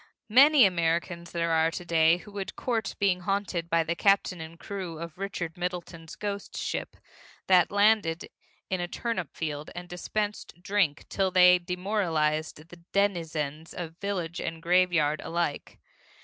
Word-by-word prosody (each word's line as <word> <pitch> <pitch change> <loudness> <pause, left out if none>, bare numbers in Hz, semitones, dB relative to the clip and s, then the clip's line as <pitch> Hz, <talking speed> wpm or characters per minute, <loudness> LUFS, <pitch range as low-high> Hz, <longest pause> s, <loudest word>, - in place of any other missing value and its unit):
Many 275 +3 +7
Americans 170 -1 0
there 170 -1 -1
are 160 0 +3
to 175 +1 -6
day 165 0 +4
who 205 +4 -13
would 200 -1 -5
court 225 -5 -2
being 195 -3 +2
haunted 180 -2 -2
by 165 0 +3
the 170 +1 -2
captain 195 -2 +2
and 165 +1 -9
crew 185 -5 -6
of 170 +2 -8
Richard 180 -4 -4
Middleton's 175 -2 -5
Ghost 200 -1 -5
Ship - - -4 0.5
that 185 -2 +5
landed 205 -5 +2 0.4
in 185 -1 -2
a 175 - -2
turnip 185 - -4
field 150 -2 -4
and 175 0 -7
dispensed 205 +1 -4
drink 180 -5 0
till 195 -1 0
they 180 -1 +6
demoralized 170 -4 -1
the 175 - -12
denizens 165 -6 -1
of 165 -2 -6
village 180 -4 -3
and 165 0 -5
graveyard 175 -4 +3
alike. 170 -3 -3
175 Hz, 150 wpm, -28 LUFS, 165-195 Hz, 0.5 s, Many